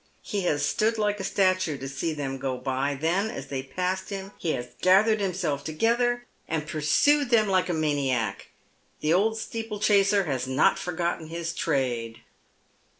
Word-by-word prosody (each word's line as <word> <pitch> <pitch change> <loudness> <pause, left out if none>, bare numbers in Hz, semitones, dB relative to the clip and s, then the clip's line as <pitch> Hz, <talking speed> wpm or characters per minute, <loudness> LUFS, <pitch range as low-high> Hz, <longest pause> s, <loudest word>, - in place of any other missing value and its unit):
He 205 - -2
has 145 -4 +1
stood 225 +7 +1
like 210 -1 0
a - - -3
statue 185 -5 +1
to 135 - -6
see 140 +4 -2
them 135 -3 -4
go 130 -1 -2
by, 135 +2 -1
then, 180 +8 +1
as 135 -8 -7
they 135 -2 -2
passed 180 +7 -3
him, 195 -1 -6
he 165 - -1
has 125 -1 -4
gathered 210 +4 +5
himself 180 -7 -1
together, 240 +8 +1 0.2
and 155 -2 -2
pursued 240 - +2
them 225 -3 +4
like 185 -2 +2
a - - +1
maniac. 140 -7 -1 0.5
The 155 +2 +2
old 220 +5 +2
steeplechaser 210 -3 +1
has 135 -6 -2
not 130 +2 +3
forgotten 170 -2 -2
his 170 +1 -4
trade. 120 -6 -1
170 Hz, 160 wpm, -26 LUFS, 140-200 Hz, 0.5 s, gathered